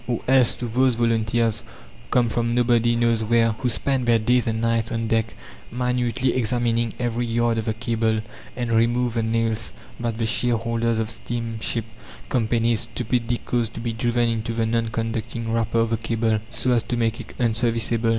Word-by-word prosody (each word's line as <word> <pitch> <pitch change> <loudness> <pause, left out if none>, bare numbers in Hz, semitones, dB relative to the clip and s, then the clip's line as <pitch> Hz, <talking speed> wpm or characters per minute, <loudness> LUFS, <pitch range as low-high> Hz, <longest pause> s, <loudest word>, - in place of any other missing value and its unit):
Or 120 -2 -1
else 130 -2 +4
to 125 - -5
those 125 +2 +2
volunteers, 115 -1 +1 0.5
come 125 -1 +3
from 115 +1 0
nobody 120 -1 +3
knows 115 -1 +2
where, 115 +1 +3
who 125 +3 -2
spent 130 +2 0
their 115 -1 +5
days 120 +2 +2
and 110 0 0
nights 115 0 0
on 115 -1 -1
deck 115 0 0 0.4
minutely 125 +1 0
examining 120 -1 0
every 120 0 -1
yard 115 0 +1
of 110 - -4
the 110 - -1
cable, 110 -1 0 0.3
and 120 -2 -2
removed 120 +1 +2
the 115 - +1
nails 115 0 -1 0.3
that 115 -2 -2
the 115 - 0
shareholders 115 0 0
of 110 0 -1
steamship 115 -1 -3 0.4
companies 115 -1 +1
stupidly 120 +1 -1
caused 120 -2 -1
to - - -5
be 115 0 -3
driven 120 +1 +1
into 115 0 -2
the 115 -1 +1
non 115 0 0
conducting 115 0 -3
wrapper 115 0 +1
of 115 0 0
the 115 - +2
cable, 115 -1 0
so 125 +2 -1
as 120 -2 +3
to 120 - -3
make 115 -1 0
it - - -12
unserviceable? 115 -1 +1
115 Hz, 180 wpm, -23 LUFS, 115-120 Hz, 0.5 s, their